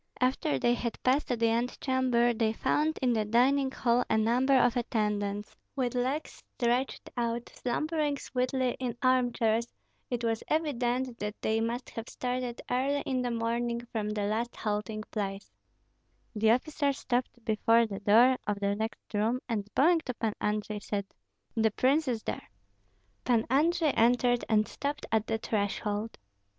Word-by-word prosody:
After 255 Hz, -, +1 dB
they 240 Hz, -, +2 dB
had 235 Hz, -1 st, -3 dB
passed 265 Hz, +4 st, +2 dB
the 230 Hz, -2 st, +1 dB
antechamber, 240 Hz, 0 st, +1 dB
they 220 Hz, -1 st, +1 dB
found 310 Hz, +7 st, 0 dB
in 250 Hz, -2 st, +3 dB
the 220 Hz, -2 st, +1 dB
dining 260 Hz, +5 st, +3 dB
hall 245 Hz, -1 st, +1 dB
a 220 Hz, -, +3 dB
number 245 Hz, +5 st, +3 dB
of 245 Hz, -2 st, +3 dB
attendants, 210 Hz, -3 st, -1 dB, 0.2 s
with 255 Hz, -3 st, -1 dB
legs 260 Hz, +5 st, -2 dB, 0.2 s
stretched 245 Hz, +2 st, 0 dB
out, 235 Hz, -1 st, -2 dB
slumbering 300 Hz, +3 st, -1 dB
sweetly 255 Hz, -1 st, -1 dB
in 245 Hz, -2 st, -3 dB
arm 255 Hz, -1 st, +3 dB
chairs; 230 Hz, 0 st, +1 dB, 0.4 s
it 240 Hz, -1 st, -2 dB
was 225 Hz, -1 st, 0 dB
evident 255 Hz, -5 st, -1 dB
that 210 Hz, 0 st, -4 dB
they 220 Hz, +1 st, +1 dB
must 235 Hz, +3 st, -3 dB
have 230 Hz, +1 st, -6 dB
started 250 Hz, -1 st, -3 dB
early 275 Hz, +3 st, +1 dB
in 260 Hz, -2 st, -1 dB
the 245 Hz, -, -1 dB
morning 235 Hz, 0 st, -1 dB
from 215 Hz, -3 st, -2 dB
the 210 Hz, -1 st, -2 dB
last 220 Hz, +4 st, -1 dB
halting 215 Hz, 0 st, -3 dB
place: 200 Hz, -2 st, -4 dB, 0.8 s
The 220 Hz, +1 st, +3 dB
officer 280 Hz, +4 st, +2 dB
stopped 245 Hz, -2 st, -3 dB
before 225 Hz, +2 st, +3 dB
the 200 Hz, -3 st, -5 dB
door 235 Hz, +5 st, +5 dB
of 205 Hz, -1 st, -1 dB
the 200 Hz, 0 st, +1 dB
next 220 Hz, +2 st, -4 dB
room, 220 Hz, +4 st, +1 dB
and 210 Hz, -4 st, -2 dB
bowing 330 Hz, +5 st, +5 dB
to 250 Hz, -, -3 dB
Pan 225 Hz, -2 st, -1 dB
Andrei, 210 Hz, 0 st, -1 dB
said, 200 Hz, -1 st, -3 dB, 0.5 s
"The 220 Hz, -1 st, +3 dB
prince 275 Hz, +8 st, +2 dB
is 230 Hz, -3 st, -1 dB
there." -, -, -5 dB, 0.7 s
Pan 235 Hz, -3 st, +2 dB
Andrei 320 Hz, +3 st, +3 dB
entered 245 Hz, +1 st, +3 dB
and 215 Hz, -1 st, +3 dB
stopped 285 Hz, +1 st, -4 dB
at 220 Hz, -1 st, +1 dB
the 225 Hz, -, 0 dB
threshold. 210 Hz, 0 st, -2 dB
235 Hz, 160 wpm, -29 LUFS, 220-255 Hz, 0.8 s, door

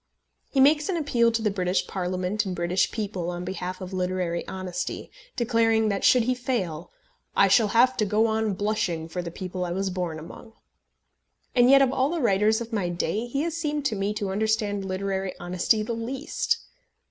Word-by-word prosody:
He 275 Hz, -, 0 dB
makes 295 Hz, +4 st, +5 dB
an 365 Hz, -, 0 dB
appeal 240 Hz, -7 st, +2 dB
to 225 Hz, -1 st, -1 dB
the 210 Hz, -, +2 dB
British 185 Hz, -1 st, 0 dB
Parliament 185 Hz, +2 st, -2 dB
and 185 Hz, -2 st, -4 dB
British 175 Hz, +2 st, +1 dB
people 195 Hz, -5 st, -3 dB
on 175 Hz, 0 st, -4 dB
behalf 185 Hz, 0 st, -5 dB
of 185 Hz, +1 st, -7 dB
literary 180 Hz, -2 st, -2 dB
honesty, 185 Hz, -1 st, -5 dB, 0.2 s
declaring 225 Hz, -2 st, +2 dB
that 200 Hz, -1 st, -2 dB
should 250 Hz, -2 st, +5 dB
he 255 Hz, +2 st, +1 dB
fail 205 Hz, -11 st, -3 dB, 0.5 s
"I -, -, +5 dB
shall 225 Hz, -3 st, +5 dB
have 245 Hz, +5 st, +4 dB
to 215 Hz, -, +2 dB
go 210 Hz, +2 st, +2 dB
on 220 Hz, -2 st, 0 dB
blushing 185 Hz, -5 st, -1 dB
for 180 Hz, +2 st, -4 dB
the 175 Hz, -, -5 dB
people 185 Hz, +1 st, -5 dB
I 175 Hz, -, -3 dB
was 190 Hz, +2 st, -1 dB
born 175 Hz, -3 st, -3 dB
among." 175 Hz, +8 st, -11 dB, 1.0 s
And 245 Hz, 0 st, +5 dB
yet 275 Hz, 0 st, +7 dB
of 265 Hz, -1 st, +1 dB
all 265 Hz, +2 st, +2 dB
the 340 Hz, +1 st, -2 dB
writers 215 Hz, -2 st, +2 dB
of 230 Hz, 0 st, -7 dB
my 195 Hz, -5 st, 0 dB
day 175 Hz, +6 st, -2 dB
he 275 Hz, +4 st, -1 dB
has 335 Hz, -1 st, -2 dB
seemed 300 Hz, -3 st, -2 dB
to 220 Hz, -, +1 dB
me 200 Hz, +1 st, -1 dB
to 205 Hz, -3 st, -2 dB
understand 210 Hz, -1 st, 0 dB
literary 190 Hz, 0 st, -2 dB
honesty 180 Hz, +5 st, +1 dB
the 235 Hz, -, -3 dB
least. 255 Hz, +6 st, -2 dB
205 Hz, 195 wpm, -26 LUFS, 185-235 Hz, 1.0 s, yet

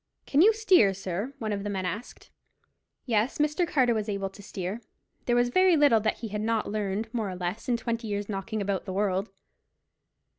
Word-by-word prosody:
"Can 285 Hz, -, +3 dB
you 420 Hz, +5 st, +7 dB
steer, 370 Hz, -, +4 dB
sir?" 195 Hz, +7 st, -4 dB
one 215 Hz, -2 st, -3 dB
of 200 Hz, -1 st, -3 dB
the 205 Hz, -, -3 dB
men 190 Hz, -2 st, -2 dB
asked. 205 Hz, +7 st, -6 dB, 0.7 s
Yes, 225 Hz, 0 st, +1 dB
Mr. 300 Hz, +4 st, +1 dB
Carter 255 Hz, -6 st, +3 dB
was 215 Hz, -1 st, -2 dB
able 195 Hz, -1 st, -2 dB
to 205 Hz, -, -13 dB
steer. 195 Hz, +2 st, -5 dB, 0.5 s
There 240 Hz, -, +3 dB
was 245 Hz, 0 st, +3 dB
very 370 Hz, +4 st, +4 dB
little 285 Hz, -6 st, +5 dB
that 215 Hz, +1 st, -1 dB
he 225 Hz, -, -4 dB
had 210 Hz, +1 st, -3 dB
not 220 Hz, -1 st, 0 dB
learned 210 Hz, +2 st, -2 dB
more 220 Hz, -4 st, -1 dB
or 185 Hz, -, -5 dB
less 180 Hz, +7 st, -4 dB
in 240 Hz, -, +2 dB
twenty 230 Hz, -1 st, -3 dB
years' 205 Hz, -1 st, -3 dB
knocking 210 Hz, +1 st, -3 dB
about 195 Hz, -1 st, -2 dB
the 190 Hz, -, -5 dB
world. 195 Hz, 0 st, 0 dB
215 Hz, 200 wpm, -27 LUFS, 200-245 Hz, 0.7 s, you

